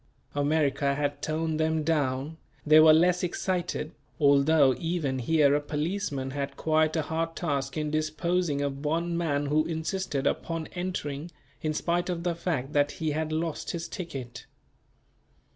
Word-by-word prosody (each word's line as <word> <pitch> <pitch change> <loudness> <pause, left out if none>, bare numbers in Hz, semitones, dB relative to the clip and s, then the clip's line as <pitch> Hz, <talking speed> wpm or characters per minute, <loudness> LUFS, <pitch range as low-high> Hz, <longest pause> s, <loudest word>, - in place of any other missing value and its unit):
America 145 -1 +1
had 145 0 -2
toned 160 0 -1
them 160 0 +1
down, 150 -1 0 0.3
they 155 +1 +7
were 155 0 +8
less 175 +3 +4
excited, 180 -3 -2 0.3
although 140 -1 +5
even 160 -6 -1
here 145 +2 +3
a 145 - +2
policeman 150 -3 -2
had 140 0 -4
quite 155 0 +2
a 160 - +1
hard 165 +2 -2
task 140 -4 -2
in 150 -1 -1
disposing 155 0 0
of 140 0 -3
one 170 +3 0
man 145 -4 0
who 150 +2 +2
insisted 160 -2 -2
upon 165 +2 -1
entering, 175 -4 -4 0.3
in 155 - 0
spite 175 +3 -1
of 170 -1 -2
the 175 -1 0
fact 155 -5 -3
that 145 0 +2
he 160 -2 -2
had 155 +1 -2
lost 160 0 -2
his 170 -1 -4
ticket. 135 -10 -7
155 Hz, 150 wpm, -28 LUFS, 145-165 Hz, 0.3 s, were